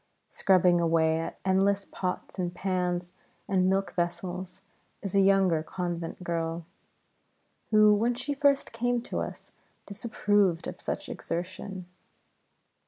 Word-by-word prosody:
Scrubbing 180 Hz, -2 st, +4 dB
away 160 Hz, -1 st, +3 dB
at 165 Hz, -, -5 dB
endless 195 Hz, +1 st, +2 dB
pots 185 Hz, +1 st, -4 dB
and 175 Hz, -1 st, -2 dB
pans 180 Hz, -2 st, -1 dB, 0.3 s
and 185 Hz, -1 st, +2 dB
milk 195 Hz, +1 st, 0 dB
vessels 180 Hz, +2 st, -3 dB, 0.4 s
is 195 Hz, -, -4 dB
a 200 Hz, -, +5 dB
younger 190 Hz, -4 st, +4 dB
convent 175 Hz, +1 st, -4 dB
girl, 165 Hz, -1 st, -2 dB, 1.0 s
who, 215 Hz, -1 st, +6 dB
when 230 Hz, +4 st, +2 dB
she 270 Hz, +4 st, -2 dB
first 280 Hz, 0 st, +2 dB
came 240 Hz, +1 st, 0 dB
to -, -, -3 dB
us, -, -, -6 dB, 0.3 s
disapproved 205 Hz, -4 st, +1 dB
of -, -, -7 dB
such -, -, -3 dB
exertion. 185 Hz, +2 st, -5 dB
185 Hz, 120 wpm, -28 LUFS, 175-200 Hz, 1.0 s, who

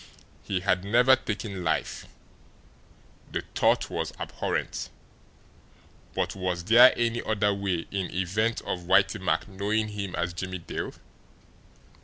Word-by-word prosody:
He 95 Hz, -2 st, -2 dB
had 95 Hz, -1 st, +1 dB
never 120 Hz, +6 st, +5 dB
taken 105 Hz, -5 st, -5 dB
life 80 Hz, -, -1 dB, 1.2 s
the -, -, -2 dB
thought -, -, +2 dB
was -, -, -2 dB
abhorrent! -, -, -3 dB, 1.3 s
But -, -, -1 dB
was 90 Hz, -2 st, -2 dB
there 120 Hz, +6 st, +8 dB
any 120 Hz, 0 st, 0 dB
other 105 Hz, -2 st, +1 dB
way 95 Hz, -4 st, -2 dB
in 95 Hz, -2 st, -2 dB
event 105 Hz, +6 st, 0 dB
of 90 Hz, -1 st, -4 dB
Whitey 95 Hz, -, +3 dB
Mack -, -, 0 dB
knowing 105 Hz, +2 st, -1 dB
him 100 Hz, -3 st, -4 dB
as 85 Hz, 0 st, -2 dB
Jimmie 95 Hz, +1 st, -4 dB
Dale? 85 Hz, -, -5 dB
100 Hz, 125 wpm, -27 LUFS, 90-110 Hz, 1.3 s, there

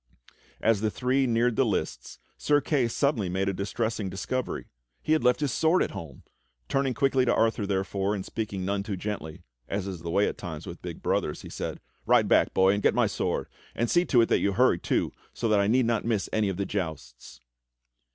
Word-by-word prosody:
As 110 Hz, -2 st, +3 dB
the 110 Hz, -, +1 dB
three 130 Hz, +4 st, +1 dB
neared 120 Hz, 0 st, +2 dB
the 135 Hz, -, +3 dB
lists 110 Hz, -5 st, -3 dB, 0.2 s
Sir 145 Hz, -1 st, +2 dB
Kay 140 Hz, -4 st, +1 dB
suddenly 115 Hz, -5 st, 0 dB
made 95 Hz, +2 st, -1 dB
a 100 Hz, -, +1 dB
distressing 100 Hz, +2 st, -2 dB
disco 95 Hz, +8 st, -2 dB
very^ -, -, -6 dB, 0.2 s
— -, -, -49 dB
he 155 Hz, -, +2 dB
had 155 Hz, -, +2 dB
left 125 Hz, +3 st, +3 dB
his 145 Hz, -3 st, 0 dB
sword 160 Hz, +7 st, +3 dB
at -, -, -3 dB
home! 75 Hz, -6 st, -9 dB, 0.4 s
Turning 135 Hz, -2 st, 0 dB
quickly 135 Hz, -2 st, +2 dB
to 125 Hz, -, +2 dB
Arthur, 110 Hz, -2 st, +1 dB
therefore, 95 Hz, +1 st, -1 dB
and 95 Hz, -, -5 dB
speaking 100 Hz, -4 st, -4 dB
none 100 Hz, +1 st, 0 dB
too 100 Hz, -1 st, -4 dB
gently 90 Hz, -5 st, -5 dB
— -, -, -47 dB
as 100 Hz, -1 st, -2 dB
is 95 Hz, -3 st, -5 dB
the 85 Hz, +1 st, -6 dB
way 100 Hz, +4 st, +2 dB
at -, -, -4 dB
times 80 Hz, -5 st, -6 dB
with -, -, -8 dB
big -, -, -7 dB
brothers, -, -, -1 dB
he -, -, -9 dB
said: -, -, -5 dB, 0.3 s
"Ride -, -, +5 dB
back, -, -, +4 dB
boy, 95 Hz, +1 st, +4 dB
and 100 Hz, -, -1 dB
get -, -, +3 dB
my -, -, +4 dB
sword; -, -, -2 dB, 0.3 s
and 120 Hz, -, 0 dB
see 175 Hz, -, +4 dB
to 125 Hz, -8 st, +4 dB
it 115 Hz, -, +2 dB
that -, -, +3 dB
you 100 Hz, -, +1 dB
hurry 120 Hz, -5 st, +3 dB
too, -, -, 0 dB, 0.2 s
so 115 Hz, -, -1 dB
that 105 Hz, -1 st, +4 dB
I 100 Hz, -, +2 dB
need 125 Hz, +3 st, +3 dB
not 115 Hz, -2 st, 0 dB
miss 110 Hz, -4 st, 0 dB
any 110 Hz, -2 st, +2 dB
of 95 Hz, -, -3 dB
the 100 Hz, -, -1 dB
jousts." 80 Hz, -12 st, -5 dB
105 Hz, 230 wpm, -27 LUFS, 95-125 Hz, 0.4 s, Ride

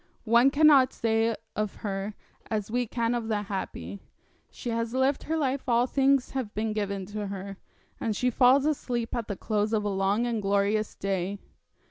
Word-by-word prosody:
One 235 Hz, +4 st, +5 dB
cannot 280 Hz, -3 st, +5 dB
say 225 Hz, 0 st, +1 dB, 0.2 s
of 215 Hz, -2 st, -2 dB
her 200 Hz, +1 st, -3 dB, 0.3 s
as 215 Hz, -1 st, -2 dB
we 245 Hz, 0 st, 0 dB
can 235 Hz, +1 st, -1 dB
of 235 Hz, -2 st, -2 dB
the 210 Hz, -2 st, -1 dB
happy; 100 Hz, -, -5 dB, 0.5 s
she 240 Hz, -, -6 dB
has 230 Hz, +1 st, -2 dB
lived 265 Hz, +2 st, +2 dB
her 320 Hz, +1 st, -1 dB
life 270 Hz, -3 st, -1 dB
all 240 Hz, +1 st, +4 dB
things 270 Hz, 0 st, +2 dB
have 255 Hz, -6 st, -4 dB
been 215 Hz, +1 st, -1 dB
given 200 Hz, -2 st, -2 dB
to 205 Hz, +1 st, -5 dB
her, 195 Hz, 0 st, -6 dB, 0.4 s
and 220 Hz, -2 st, -1 dB
she 250 Hz, +4 st, +1 dB
falls 260 Hz, +3 st, +5 dB
asleep 245 Hz, -6 st, -1 dB
at 235 Hz, -3 st, -3 dB
the 200 Hz, -, -4 dB
close 215 Hz, 0 st, -1 dB
of 215 Hz, -1 st, +1 dB
a 205 Hz, -, -1 dB
long 195 Hz, +4 st, +1 dB
and 230 Hz, -3 st, -1 dB
glorious 200 Hz, +2 st, +1 dB
day. 195 Hz, 0 st, -2 dB
225 Hz, 180 wpm, -27 LUFS, 205-250 Hz, 0.5 s, One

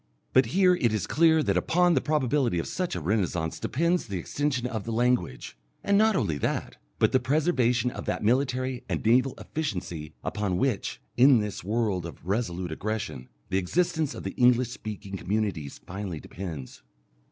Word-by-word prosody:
But 130 Hz, -2 st, +5 dB
here 180 Hz, +7 st, +4 dB
it 125 Hz, -10 st, +1 dB
is 110 Hz, -, -1 dB
clear 160 Hz, -1 st, +4 dB
that -, -, +1 dB
upon 175 Hz, +1 st, +3 dB
the -, -, +2 dB
probability 140 Hz, -, +1 dB
of 85 Hz, -, -1 dB
such 185 Hz, -2 st, -2 dB
a -, -, -2 dB
renascence 90 Hz, -2 st, -1 dB
depends 170 Hz, +4 st, 0 dB
the 100 Hz, -3 st, -3 dB
extension 130 Hz, -, -1 dB
of 115 Hz, -5 st, -3 dB
the 115 Hz, -, -4 dB
language, 115 Hz, -, 0 dB, 0.3 s
and 200 Hz, -, +2 dB
not 215 Hz, +1 st, +4 dB
only 85 Hz, -, 0 dB
that, -, -, -2 dB, 0.2 s
but -, -, +3 dB
the 130 Hz, -, +4 dB
preservation 125 Hz, -4 st, +2 dB
of -, -, -7 dB
that -, -, -2 dB
military 130 Hz, +1 st, +1 dB
and -, -, -2 dB
naval 125 Hz, +3 st, +3 dB
efficiency 90 Hz, -, -4 dB
upon 100 Hz, -4 st, -1 dB
which, 125 Hz, -2 st, -1 dB, 0.2 s
in 130 Hz, +1 st, +7 dB
this 105 Hz, -2 st, -3 dB
world 100 Hz, -4 st, 0 dB
of 80 Hz, -1 st, -12 dB
resolute 95 Hz, -4 st, -2 dB
aggression, 100 Hz, -, -4 dB, 0.2 s
the 95 Hz, -, +2 dB
existence 160 Hz, -, 0 dB
of -, -, -7 dB
the -, -, -3 dB
English 125 Hz, -1 st, +4 dB
speaking 105 Hz, -4 st, -6 dB
communities 95 Hz, -, -2 dB
finally 95 Hz, -2 st, -5 dB
depends. 80 Hz, -9 st, -7 dB
115 Hz, 170 wpm, -27 LUFS, 95-135 Hz, 0.3 s, in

